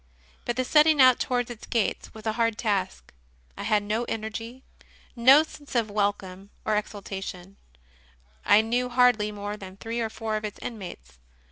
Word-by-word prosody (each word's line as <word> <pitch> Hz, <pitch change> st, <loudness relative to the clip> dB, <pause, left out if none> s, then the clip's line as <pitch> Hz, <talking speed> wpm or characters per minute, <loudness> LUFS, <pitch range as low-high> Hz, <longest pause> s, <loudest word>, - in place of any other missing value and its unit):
But 240 Hz, -, -1 dB
the 255 Hz, +1 st, -1 dB
setting 305 Hz, +2 st, +5 dB
out 255 Hz, -2 st, +7 dB
towards 245 Hz, -1 st, -1 dB
its 230 Hz, -, -10 dB
gates 230 Hz, -3 st, -1 dB
was 220 Hz, 0 st, -12 dB
a 220 Hz, -, 0 dB
hard 230 Hz, -1 st, 0 dB
task. 195 Hz, -4 st, -2 dB, 0.4 s
I -, -, -7 dB
had 210 Hz, -1 st, +1 dB
no 215 Hz, +3 st, -1 dB
energy, 225 Hz, +3 st, -5 dB, 0.5 s
no 265 Hz, +5 st, +7 dB
sense 290 Hz, -3 st, -12 dB
of 225 Hz, -3 st, +1 dB
welcome 200 Hz, -2 st, -2 dB, 0.2 s
or 215 Hz, -, +1 dB
ex 210 Hz, 0 st, -1 dB
ultation; 195 Hz, -2 st, -7 dB, 0.9 s
I 205 Hz, +2 st, +6 dB
knew 245 Hz, +3 st, -1 dB
hardly 245 Hz, -4 st, +3 dB
more 205 Hz, 0 st, -5 dB
than 190 Hz, -1 st, -11 dB
three 230 Hz, +3 st, -4 dB
or 225 Hz, -1 st, -1 dB
four 220 Hz, 0 st, -3 dB
of 215 Hz, -, -6 dB
its 210 Hz, -1 st, -5 dB
inmates. 120 Hz, -, -8 dB
220 Hz, 170 wpm, -26 LUFS, 205-240 Hz, 0.9 s, out